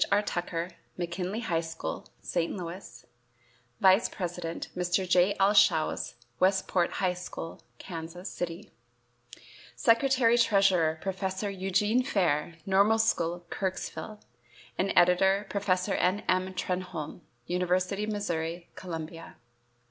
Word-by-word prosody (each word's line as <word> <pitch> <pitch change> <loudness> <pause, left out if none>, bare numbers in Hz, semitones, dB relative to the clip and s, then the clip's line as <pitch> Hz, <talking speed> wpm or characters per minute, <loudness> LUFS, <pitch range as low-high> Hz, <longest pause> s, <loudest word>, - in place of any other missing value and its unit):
R. 205 +1 +4
Tucker, 175 -2 -3 0.3
McKinley 180 +5 -3
High 170 -8 0
School, 165 0 -5 0.2
St. 170 +2 -1
Louis; 170 -8 -8 0.7
vice 190 +4 +5
president, 175 -2 -4
Mr. 180 +1 0
J. 180 +2 +4
L. 195 +2 +5
Shouse, 180 -6 +3 0.2
Westport 185 -2 +2
High 185 -2 +1
School, 180 -2 -7 0.2
Kansas 170 +1 -7
City; 175 +4 -5 1.0
secretary 240 -1 +4
treasurer, 190 -8 +3
Professor 190 +1 -2
Eugene 195 +5 +1
Fair, 175 - 0
Normal 200 +3 +4
School, 175 -6 +1
Kirksville, 205 +2 -4 0.6
and 195 +1 0
editor, 190 +3 +4
Professor 195 -1 +1
N. 185 +3 +1
M. 185 0 +1
Trenholme, 180 -3 -4 0.2
University 180 +3 0
of 215 - -3
Missouri, 170 -4 -3
Columbia. 165 -2 -7
185 Hz, 110 wpm, -29 LUFS, 175-200 Hz, 1.0 s, vice